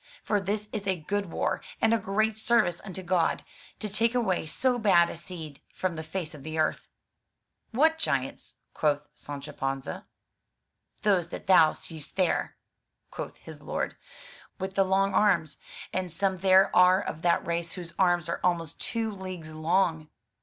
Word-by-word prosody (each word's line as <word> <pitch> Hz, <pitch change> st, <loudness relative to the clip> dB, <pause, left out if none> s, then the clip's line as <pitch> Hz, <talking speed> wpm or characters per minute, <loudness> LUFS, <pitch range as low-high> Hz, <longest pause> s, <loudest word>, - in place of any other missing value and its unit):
For 205 Hz, -2 st, +1 dB
this 205 Hz, +2 st, -2 dB
is 205 Hz, -2 st, -4 dB
a 190 Hz, -2 st, +1 dB
good 200 Hz, +5 st, -2 dB
war, 165 Hz, -, -1 dB, 0.2 s
and 225 Hz, 0 st, +4 dB
a 230 Hz, -, +3 dB
great 215 Hz, +2 st, +1 dB
service 220 Hz, -6 st, +2 dB
unto 190 Hz, -2 st, -7 dB
God, 175 Hz, -2 st, +1 dB, 0.3 s
to 215 Hz, -, -3 dB
take 225 Hz, +4 st, +1 dB
away 190 Hz, -9 st, +1 dB
so 250 Hz, +9 st, +1 dB
bad 175 Hz, -6 st, +5 dB
a -, -, -7 dB
seed 165 Hz, -4 st, -9 dB
from 185 Hz, -2 st, -1 dB
the 160 Hz, -, -4 dB
face 160 Hz, 0 st, -5 dB
of 150 Hz, -, -10 dB
the 155 Hz, +2 st, -5 dB
earth.'' 155 Hz, -1 st, 0 dB, 0.8 s
"What 320 Hz, +7 st, +3 dB
giants?'* -, -, -2 dB, 0.2 s
quoth 150 Hz, -1 st, +1 dB
Sancho 145 Hz, +1 st, -8 dB
Panza. 135 Hz, 0 st, -4 dB, 1.0 s
"Those 185 Hz, -5 st, +2 dB
that -, -, -7 dB
thou 165 Hz, -5 st, +6 dB
seest 160 Hz, -3 st, -9 dB
there," 185 Hz, -2 st, +1 dB, 0.6 s
quoth -, -, -6 dB
his -, -, -12 dB
lord, -, -, -3 dB, 0.6 s
"with 190 Hz, 0 st, -4 dB
the 195 Hz, -, +4 dB
long 195 Hz, +1 st, +2 dB
arms. 180 Hz, -7 st, +2 dB, 0.3 s
And 185 Hz, -2 st, -2 dB
some 190 Hz, +2 st, 0 dB
there 190 Hz, +1 st, +5 dB
are 180 Hz, +1 st, +7 dB
of 160 Hz, -5 st, -5 dB
that 170 Hz, 0 st, +2 dB
race 170 Hz, 0 st, -2 dB
whose 175 Hz, -2 st, -7 dB
arms 175 Hz, -3 st, +3 dB
are 170 Hz, -, -2 dB
almost 170 Hz, -4 st, 0 dB
two 225 Hz, -1 st, -1 dB
leagues 185 Hz, -5 st, -7 dB
long." 160 Hz, -1 st, +1 dB
185 Hz, 165 wpm, -28 LUFS, 160-200 Hz, 1.0 s, are